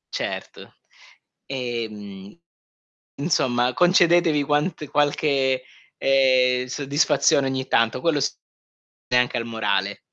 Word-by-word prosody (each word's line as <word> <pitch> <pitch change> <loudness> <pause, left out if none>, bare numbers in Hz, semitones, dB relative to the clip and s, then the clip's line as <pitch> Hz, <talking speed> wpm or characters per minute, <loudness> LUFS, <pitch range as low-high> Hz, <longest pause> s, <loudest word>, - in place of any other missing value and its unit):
Certo. - - -6 0.7
Ehm, 110 - -6 0.8
insomma, 125 -5 0
concedetevi 175 -3 +3
quant 150 +2 -1
qualche, 140 -3 +1 0.3
ehm, 130 -2 +2
soddisfazione 140 +1 +1
ogni 130 0 -3
tanto, 115 +1 +1
quello 160 -4 +1
s - - -2 0.7
e 125 - +1
anche 125 0 +1
al 115 - -4
morale. 110 -3 -2
130 Hz, 95 wpm, -22 LUFS, 125-145 Hz, 0.8 s, concedetevi